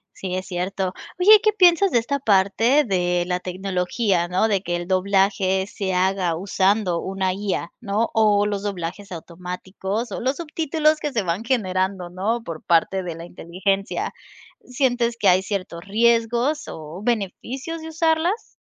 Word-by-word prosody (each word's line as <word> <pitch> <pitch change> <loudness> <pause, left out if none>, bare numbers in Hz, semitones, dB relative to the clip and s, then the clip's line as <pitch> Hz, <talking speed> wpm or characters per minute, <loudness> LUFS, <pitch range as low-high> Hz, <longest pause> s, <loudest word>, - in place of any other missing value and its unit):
Sí, 185 -1 -5
es 185 0 -3
cierto. 185 +1 -2 0.3
Oye, 415 +4 +8
¿qué 430 -1 +3
piensas 370 -1 +5
de 240 - +3
esta 260 +5 -1
parte 225 +5 +3
de 180 -4 0
la 180 0 -1
tecnología, 185 0 -1
¿no? 185 +5 +2
De 200 -3 +1
que 175 -2 -2
el 175 0 -5
doblaje 190 0 +1
se 195 -2 -3
haga 185 -2 +1
usando 190 0 +1
una 190 -1 -1
IA, 195 -3 -3
¿no? 220 0 -1
O 210 -2 +3
los 205 -1 -2
doblajes 195 0 -5
automáticos 185 +6 -5
o - - -4
los 265 +3 0
subtítulos 315 -1 0
que 295 -2 -3
se 225 -4 0
van 180 +4 -2
generando, 190 -6 -1
¿no?, 210 +6 -1
por 165 -5 -7
parte 175 +3 +2
de 175 -2 -5
la 165 +1 -9
inteligencia, 190 +3 -2 0.5
¿sientes 245 -2 0
que 200 - +3
hay 185 +1 +5
ciertos 185 -4 -4
riesgos 235 +7 +2
o 160 +4 -8
beneficios 245 - -3
de 320 - -8
usarlas? 325 +5 0
195 Hz, 155 wpm, -22 LUFS, 185-235 Hz, 0.5 s, Oye